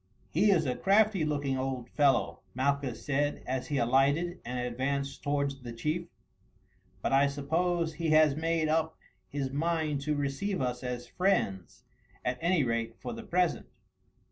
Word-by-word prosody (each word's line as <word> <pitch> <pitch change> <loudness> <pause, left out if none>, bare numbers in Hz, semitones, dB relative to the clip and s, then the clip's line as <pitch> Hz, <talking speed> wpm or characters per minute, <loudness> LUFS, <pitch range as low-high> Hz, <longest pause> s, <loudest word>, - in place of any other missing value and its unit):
"He 210 - +3
is 170 -6 +4
a 125 - 0
crafty 200 -2 +3
looking 145 -3 -1
old 130 -2 -3
fellow," 135 -9 +2 0.2
Malchus 140 -1 -1
said 145 +1 0
as 130 0 -2
he 145 - -1
alighted 140 +8 +2
and 125 +1 -4
advanced 135 +3 -2
towards 140 -1 -1
the 120 -1 -7
chief, 155 +9 -2 1.0
"but - - 0
I 140 +1 +5
suppose 160 +4 0
he 160 +1 -2
has 155 -2 +5
made 165 0 0
up 160 +1 0 0.3
his 135 -2 -3
mind 155 -1 0
to 150 +1 0
receive 145 +8 -1
us 125 -1 -2
as 125 -1 -4
friends, 120 - -1 0.4
at 125 0 -1
any 170 -2 +3
rate 115 -1 -1
for - - -5
the 230 - -7
present. 180 -6 0
145 Hz, 155 wpm, -30 LUFS, 130-165 Hz, 1.0 s, I